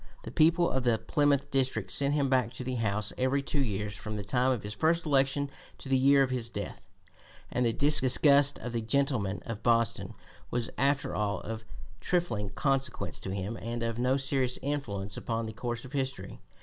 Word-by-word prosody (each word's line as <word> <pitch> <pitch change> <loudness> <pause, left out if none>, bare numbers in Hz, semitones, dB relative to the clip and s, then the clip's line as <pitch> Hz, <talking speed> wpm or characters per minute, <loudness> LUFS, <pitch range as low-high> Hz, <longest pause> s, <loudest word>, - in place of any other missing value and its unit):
The - - -7
people 170 +2 +4
of 130 -1 -1
the 120 -2 +3
Plymouth 145 +1 +1
district 130 -8 0
sent 140 +1 +2
him 140 -2 +1
back 130 -3 +1
to 125 - -6
the 130 +1 -3
House 105 -1 -1
every 135 +2 +1
two 145 0 -1
years 105 -4 -2
from 105 -2 -6
the 105 - -4
time 125 +5 +1
of 120 -6 -2
his 105 0 -5
first 165 +9 +1
election 140 -1 +1 0.3
to 135 - -9
the 135 - +3
year 135 +1 +5
of 130 - -2
his 120 -3 -2
death, 100 -4 -6 0.7
and 125 0 +1
the - - +2
disgust 140 +1 +5
of 125 - -6
the 115 - -1
gentlemen 115 -4 0
of 115 -2 -6
Boston 115 -1 +1 0.3
was 120 -1 -2
after 140 +1 0
all 105 -1 -1
of 110 +1 -6 0.4
trifling 145 - -1
consequence 135 +2 -1
to - - -6
him 100 +4 -4
and 115 +1 -4
of 115 0 -2
no 130 +2 +2
serious 135 -2 0
influence 105 -9 -3
upon 115 0 -3
the 110 - -6
course 120 +2 -4
of 130 - -12
history. 135 -1 -3
125 Hz, 195 wpm, -29 LUFS, 110-140 Hz, 0.7 s, year